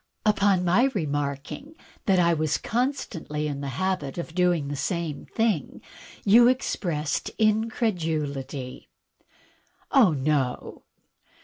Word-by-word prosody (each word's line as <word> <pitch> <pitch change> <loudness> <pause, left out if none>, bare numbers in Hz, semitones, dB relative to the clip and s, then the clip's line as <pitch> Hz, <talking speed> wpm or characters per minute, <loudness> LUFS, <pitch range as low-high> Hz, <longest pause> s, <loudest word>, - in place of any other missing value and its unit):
On 195 -3 +3
my 185 +9 +4
remarking 145 - -3 0.3
that 190 -2 +4
I 170 -1 +4
was 155 -1 0
constantly 205 - -2
in 140 -1 -4
the 140 - -4
habit 185 -7 -1
of 170 -1 -5
doing 175 -4 +2
the 145 - -3
same 165 0 -3
thing 220 - -1 0.5
you 235 +4 +7
expressed 170 - -1
incredulity." 160 - -1 1.0
"Oh, 230 - +5
no!" 135 -2 -1
170 Hz, 105 wpm, -26 LUFS, 145-210 Hz, 1.0 s, you